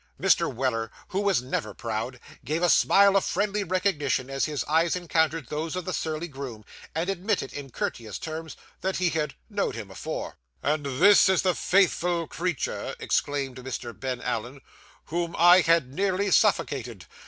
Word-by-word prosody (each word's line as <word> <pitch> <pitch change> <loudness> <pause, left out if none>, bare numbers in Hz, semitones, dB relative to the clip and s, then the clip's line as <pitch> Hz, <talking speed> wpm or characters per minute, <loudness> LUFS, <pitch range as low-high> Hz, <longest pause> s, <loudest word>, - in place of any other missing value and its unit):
Mr. - - +3
Weller, 115 -3 -1 0.2
who 195 - -1
was 200 -11 +2
never 130 - -3
proud, 115 +2 -4 0.2
gave 160 +4 -2
a 175 - +5
smile 200 0 +5
of 195 - +4
friendly 205 +2 0
recognition 160 -8 0
as 135 0 0
his 150 -2 -2
eyes 165 +3 +2
encountered 165 -3 0
those 155 +3 -3
of 185 -2 -4
the 185 - -3
surly 160 +1 -2
groom, 135 -8 -8 0.3
and 165 +2 -1
admitted 195 -7 -1
in 140 -2 -7
courteous 115 -3 -4
terms, 160 0 -6 0.2
that 190 +1 -1
he 180 -1 +2
had 155 -1 -2
'knowed 205 -2 -2
him 105 -4 -7
afore.' - - -5 0.3
'And 150 +1 +1
this 190 +10 +6
is 190 -2 +3
the 185 -1 +3
faithful 175 -3 +2
creature,' 170 -1 -3
exclaimed 140 -3 -1
Mr. 125 -2 -6
Ben 130 -2 -3
Allen, 125 +2 -4 0.4
'whom 170 +1 -2
I 175 +2 +8
had 165 -6 +2
nearly 195 +3 0
suffocated! 145 - +1
160 Hz, 165 wpm, -26 LUFS, 135-180 Hz, 0.4 s, I